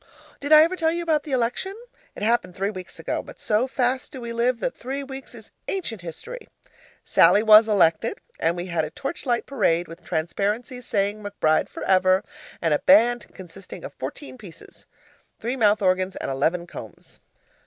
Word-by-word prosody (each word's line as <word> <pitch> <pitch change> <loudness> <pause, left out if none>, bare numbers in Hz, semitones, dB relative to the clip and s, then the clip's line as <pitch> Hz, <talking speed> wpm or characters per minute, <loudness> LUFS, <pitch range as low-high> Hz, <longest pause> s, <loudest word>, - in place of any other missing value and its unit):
Did 285 +2 -5
I 310 0 +10
ever 335 +3 0
tell 325 -3 +1
you 345 +1 -2
about 310 -3 +1
the 300 - -7
election? 255 +10 -1 0.4
It - - -7
happened 215 -5 +1
three 195 +2 -1
weeks 185 -3 -9
ago, - - -3
but - - -13
so 220 +4 +1
fast 260 0 -1
do 265 - -8
we 235 -1 -6
live, 235 +1 +1
that - - -2
three 270 +3 -5
weeks 270 0 -9
is - - -13 0.2
ancient 240 - -3
history. 175 - -8 0.6
Sallie 210 - +5
was 215 0 +8
elected, 170 -6 +2 0.2
and 165 +2 +1
we 175 - -4
had 170 -3 -1
a 155 - -3
torchlight 255 - -3
parade 175 -10 +1
with 165 +2 -12
transparencies 205 - -2
saying, 205 +1 0
'McBride 200 -6 +1
for - - -8
Ever,' 185 +1 +3 0.4
and 165 -2 +3
a 150 - +2
band 240 -4 +4
consisting 185 +1 -11
of - - -8
fourteen 280 -3 -8
pieces 180 -6 -13 0.5
(three 240 +3 -3
mouth 210 -4 +3
organs 185 0 +1
and - - -4
eleven 165 +6 0
combs). - - -11
215 Hz, 180 wpm, -24 LUFS, 185-260 Hz, 0.6 s, I